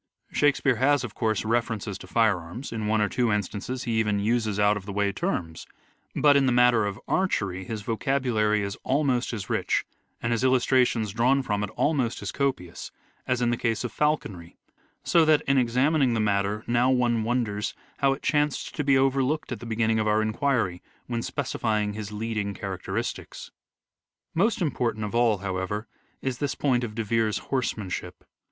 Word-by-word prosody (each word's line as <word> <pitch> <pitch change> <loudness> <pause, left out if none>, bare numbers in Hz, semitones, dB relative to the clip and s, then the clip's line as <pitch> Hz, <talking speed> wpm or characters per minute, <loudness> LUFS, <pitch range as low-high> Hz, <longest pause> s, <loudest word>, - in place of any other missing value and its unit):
Shakespeare 140 -3 +2
has, 140 +2 +3
of 115 -4 -6
course, 110 -3 -1
references 110 -3 -1
to - - -11
firearms; 110 +1 0
in 110 -2 -3
one 110 0 +2
or 105 - +3
two 120 +1 0
instances 105 +5 -2
he 115 -2 0
even 105 -2 +1
uses 110 -1 0
out 105 0 +4
of 100 -1 -7
the - - -4
way 100 0 +1
terms; 90 - -3 0.5
but, 145 -1 +5
in 140 -1 +4
the - - +3
matter 120 -3 +4
of 100 - -5
archery 100 - 0
his 110 +1 -5
vocabulary 110 -3 +1
is 100 0 -3
almost 130 -3 +1
as 105 -5 -5
rich, - - 0 0.3
and 115 - -2
his 115 +1 0
illustrations 125 -4 +3
drawn 130 +4 +3
from 105 -4 -1
it 105 - -3
almost 135 -7 0
as - - -3
copious, 130 -12 -2 0.4
as 125 -1 +1
in 120 - +2
the 120 - 0
case 115 -1 -1
of 125 - -3
falconry; 105 - -2 0.5
so 170 - +4
that, 155 -1 +4
in 135 -1 +3
examining 130 +2 +2
the - - 0
matter 105 0 0
now 120 +2 +2
one 120 -3 +2
wonders 110 -3 -1 0.2
how 140 -1 +3
it 135 - -4
chanced 150 -1 0
to 150 - -2
be 135 -1 +4
overlooked 135 +2 +1
at 120 - -3
the 120 - -8
beginning 110 0 +1
of 110 - 0
our 105 +1 +3
enquiry, 110 -5 0 0.2
when 120 -1 -2
specifying 110 -6 -1
his 105 -1 -6
leading 105 -2 -3
characteristics. 95 -2 -5 0.8
Most 200 +3 +2
important 120 -7 -1
of 105 - -6
all, 120 -3 +3
however, 95 +3 -2 0.4
is 130 -2 -2
this 145 -1 -1
point 125 -4 +1
of 110 -3 -5
De 115 - -1
Vere's 110 0 +1 0.2
horsemanship. 110 -7 -3
115 Hz, 180 wpm, -26 LUFS, 105-130 Hz, 0.8 s, but